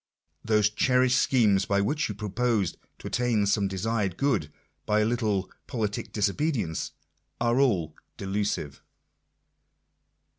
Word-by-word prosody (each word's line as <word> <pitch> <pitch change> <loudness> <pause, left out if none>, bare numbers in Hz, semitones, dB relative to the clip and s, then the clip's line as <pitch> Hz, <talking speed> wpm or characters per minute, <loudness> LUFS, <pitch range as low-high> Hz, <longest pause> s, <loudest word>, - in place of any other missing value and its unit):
Those 105 -2 +3
cherished 125 +3 +3
schemes 105 -7 +3
by 100 0 +1
which 145 +9 0
you 105 - -4
propose 105 -2 0 0.3
tol - - -15
attain 120 -4 +1
some 100 0 +2
desired 100 -1 -1
good 135 - 0 0.4
by 105 0 +3
a - - +2
little 110 -5 0 0.2
politic 105 -4 -3
disobedience, 105 - -1 0.5
are 120 +2 +2
all) 90 - +1 0.2
delusive. 95 -7 -2
105 Hz, 115 wpm, -27 LUFS, 100-120 Hz, 0.5 s, Those